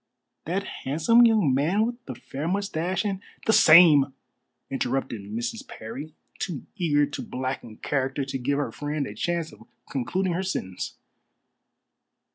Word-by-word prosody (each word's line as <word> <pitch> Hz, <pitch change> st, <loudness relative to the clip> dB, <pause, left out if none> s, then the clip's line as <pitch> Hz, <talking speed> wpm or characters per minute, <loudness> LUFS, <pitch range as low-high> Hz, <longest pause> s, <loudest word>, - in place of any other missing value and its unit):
"That 185 Hz, +5 st, -1 dB, 0.2 s
handsome 165 Hz, -, +5 dB
young 210 Hz, -, +3 dB
man 170 Hz, +11 st, +2 dB
with 240 Hz, +1 st, -5 dB
the 130 Hz, -, -5 dB
fair 140 Hz, +5 st, -6 dB
moustache 190 Hz, 0 st, -1 dB
and 195 Hz, -2 st, -2 dB
" -, -, -22 dB
"The 220 Hz, -, +3 dB
same," 155 Hz, -8 st, +7 dB, 0.6 s
interrupted 135 Hz, -4 st, -2 dB
Mrs. 120 Hz, -, -5 dB
Parry, 135 Hz, +8 st, -8 dB, 0.2 s
too 170 Hz, -8 st, -4 dB
eager 150 Hz, -7 st, +2 dB
to 145 Hz, -, -6 dB
blacken 130 Hz, -4 st, -5 dB
character 135 Hz, -1 st, -1 dB
to 135 Hz, 0 st, -3 dB
give 140 Hz, +3 st, 0 dB
her 145 Hz, -, -1 dB
friend 145 Hz, 0 st, -3 dB
a 105 Hz, -, -7 dB
chance 170 Hz, +7 st, -2 dB
of -, -, -16 dB, 0.3 s
concluding 175 Hz, +8 st, -1 dB
her 175 Hz, -, -1 dB
sentence. 95 Hz, -, -4 dB
150 Hz, 145 wpm, -26 LUFS, 135-185 Hz, 0.6 s, same